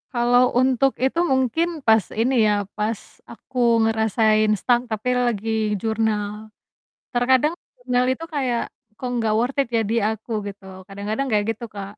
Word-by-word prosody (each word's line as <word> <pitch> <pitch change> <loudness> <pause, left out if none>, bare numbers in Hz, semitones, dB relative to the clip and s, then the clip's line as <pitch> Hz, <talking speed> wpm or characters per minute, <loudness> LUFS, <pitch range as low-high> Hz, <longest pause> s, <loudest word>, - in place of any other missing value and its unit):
Kalau 245 +1 +3
untuk 260 +1 +3
itu 265 +6 0
mungkin 265 +2 +1 0.2
pas 220 -2 +5 0.2
ini 240 0 +3
ya 205 -2 0
pas 215 0 -2 0.3
aku 255 +2 -12 0.3
ngerasain 220 -1 +2
stuck 240 +3 +2
tapi 220 +3 -2
lagi 235 -3 -1 0.3
jurnal. 215 -1 -2 0.6
Terkadang 260 +6 +2 0.3
jurnal 250 0 +1
itu 325 +5 -6
kayak, 255 -5 0 0.4
kok 255 - -3 0.2
gak 215 - +1
worth 245 +4 -1
it 270 - -8
ya - - +3
di 230 - +1
aku? 220 +1 -6 0.2
Gitu 200 0 -9 0.2
kadang-kadang 210 +7 -3
kayak 210 -2 +2
gitu 225 +1 -5
Kak. 200 -1 -6
230 Hz, 150 wpm, -22 LUFS, 215-250 Hz, 0.6 s, pas